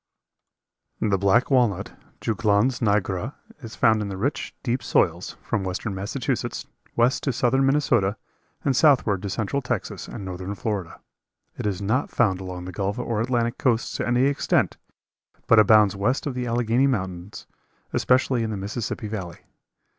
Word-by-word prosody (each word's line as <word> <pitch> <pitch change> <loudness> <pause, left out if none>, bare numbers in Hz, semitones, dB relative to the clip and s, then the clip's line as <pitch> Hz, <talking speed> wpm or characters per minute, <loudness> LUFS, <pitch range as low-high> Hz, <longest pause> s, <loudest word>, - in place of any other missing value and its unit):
The 100 -3 +1
black 100 +8 +3
walnut 110 -7 +2 0.3
(Juglans 110 +3 +1
nigra) 105 +2 0 0.3
is 115 -3 -9
found 110 -1 +3
in 105 - -3
the 95 -1 -5
rich, 135 +9 -2
deep 125 0 -1
soils, 90 -5 0
from 110 -4 -1
western 95 +3 -3
Massachusetts, 100 +6 -3 0.3
west 125 +3 +2
to 140 - 0
southern 130 +3 +2
Minnesota 120 -8 +2 0.5
and 135 - +2
southward 125 - +4
to 100 - -4
central 110 +7 -1
Texas 120 -5 -4
and 100 - -7
northern 95 +2 -5
Florida. 100 -4 -4 0.6
It - - -3
is 100 -1 -2
not 120 +8 0
found 95 -6 +1
along 90 -1 -6
the 95 - -6
gulf 100 +2 -2
or 110 -2 -1
Atlantic 120 -1 0
coasts 120 -3 +1
to - - -2
any 120 +1 +3
extent, 140 +1 +1 0.7
but 115 - +6
abounds 105 -1 +6
west 110 +7 0
of 145 - -2
the 125 0 -3
Allegheny 120 +3 +2
mountains, 95 -5 -4 0.5
especially 130 -1 +2
in 110 - -1
the 105 - -3
Mississippi 105 +3 -4
Valley. 95 -5 -6
110 Hz, 155 wpm, -24 LUFS, 100-125 Hz, 0.7 s, but